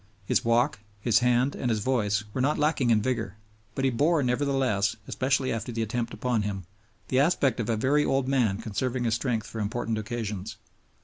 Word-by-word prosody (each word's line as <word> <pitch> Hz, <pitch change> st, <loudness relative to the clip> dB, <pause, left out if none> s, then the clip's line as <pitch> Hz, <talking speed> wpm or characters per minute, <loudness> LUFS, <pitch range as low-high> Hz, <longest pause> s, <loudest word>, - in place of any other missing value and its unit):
His -, -, +1 dB
walk, 115 Hz, +1 st, +2 dB, 0.2 s
his 115 Hz, +1 st, +3 dB
hand, 125 Hz, +2 st, +2 dB
and 125 Hz, -, -2 dB
his 110 Hz, -, +1 dB
voice 105 Hz, -3 st, 0 dB
were 130 Hz, -, -1 dB
not 140 Hz, +3 st, +2 dB
lacking 150 Hz, -4 st, +1 dB
in 110 Hz, -2 st, +3 dB
vigor, 115 Hz, -5 st, -2 dB, 0.4 s
but 135 Hz, -, 0 dB
he 135 Hz, -, +3 dB
bore 150 Hz, +5 st, +2 dB
nevertheless, 125 Hz, -5 st, +1 dB
especially 130 Hz, -1 st, 0 dB
after 115 Hz, +2 st, -4 dB
the 115 Hz, -1 st, -1 dB
attempt 115 Hz, +1 st, -2 dB
upon 125 Hz, -3 st, -1 dB
him, 100 Hz, -2 st, -3 dB, 0.5 s
the 130 Hz, -, +2 dB
aspect 140 Hz, -4 st, +2 dB
of 115 Hz, -, -2 dB
a 115 Hz, -, +1 dB
very 140 Hz, +6 st, +2 dB
old 135 Hz, -2 st, +1 dB
man 120 Hz, -8 st, +2 dB
conserving 120 Hz, +4 st, -2 dB
his 115 Hz, -2 st, +1 dB
strength 115 Hz, -2 st, -1 dB
for 110 Hz, -, -6 dB
important 110 Hz, +1 st, -2 dB
occasions. 105 Hz, -3 st, -4 dB
120 Hz, 190 wpm, -27 LUFS, 110-130 Hz, 0.5 s, his